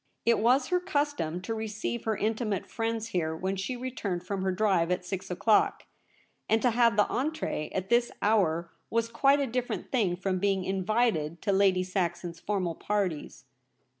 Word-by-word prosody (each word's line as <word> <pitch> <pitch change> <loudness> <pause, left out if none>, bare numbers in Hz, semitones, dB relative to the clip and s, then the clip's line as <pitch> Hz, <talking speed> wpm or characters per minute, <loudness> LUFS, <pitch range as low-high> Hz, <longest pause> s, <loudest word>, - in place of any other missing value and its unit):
It 235 0 +4
was 250 +5 +3
her 360 -1 +3
custom 290 - -1
to 225 - -3
receive 220 +1 -4
her 220 -1 0
intimate 215 -2 -1
friends 225 -1 -3
here 160 -6 -1
when 190 +4 -2
she 195 +7 -3
returned 225 -8 -3
from 195 -1 -3
her 190 0 +1
drive 185 -3 +2
at 180 0 -1
six 185 0 -5
o 180 - -2
clock; 215 +3 +3 0.7
and 220 - +4
to 245 - +4
have 230 -2 +3
the 210 - +5
entree 280 - -2
at 190 0 -3
this 240 0 +3
hour 170 -6 +2 0.2
was 230 0 +1
quite 275 +5 +3
a 280 - +1
different 250 0 -3
thing 205 -9 +2
from 185 0 -1
being 195 -1 +1
invited 190 -4 0
to 200 - +1
Lady 190 -2 +3
Saxon's 175 -2 -2
formal 185 -4 -1
parties. 190 -4 -3
205 Hz, 175 wpm, -29 LUFS, 180-230 Hz, 0.7 s, the